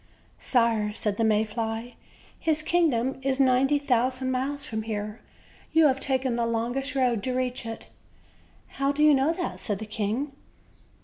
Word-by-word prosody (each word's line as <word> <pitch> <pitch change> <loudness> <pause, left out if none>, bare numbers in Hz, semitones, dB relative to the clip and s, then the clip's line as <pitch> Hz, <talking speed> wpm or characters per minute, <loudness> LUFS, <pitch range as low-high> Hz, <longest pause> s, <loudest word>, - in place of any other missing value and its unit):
"Sire," 230 -4 +2
said 210 -1 -1
the 230 - +1
May 215 -1 +3
fly, 225 +2 -4 0.5
"his 310 -1 +2
kingdom 270 -7 +1
is 265 0 -1
ninety 270 +2 +4
thou 255 -4 +2
sand 260 0 -3
miles 275 +3 -2
from 220 -1 -3
here; 215 0 -5 0.5
you 320 0 +6
have 270 -2 +3
taken 260 -3 0
the 235 -1 0
longest 245 +4 -2
road 250 -5 +2
to 255 +4 -2
reach 250 -2 -2
it." 225 0 -7 0.8
"How 275 +1 0
do 295 +1 +1
you 305 -1 +7
know 275 +3 +3
that?" 345 +1 -4
said 205 -3 -2
the 220 - -6
king. 220 +6 -2
255 Hz, 170 wpm, -26 LUFS, 225-275 Hz, 0.8 s, you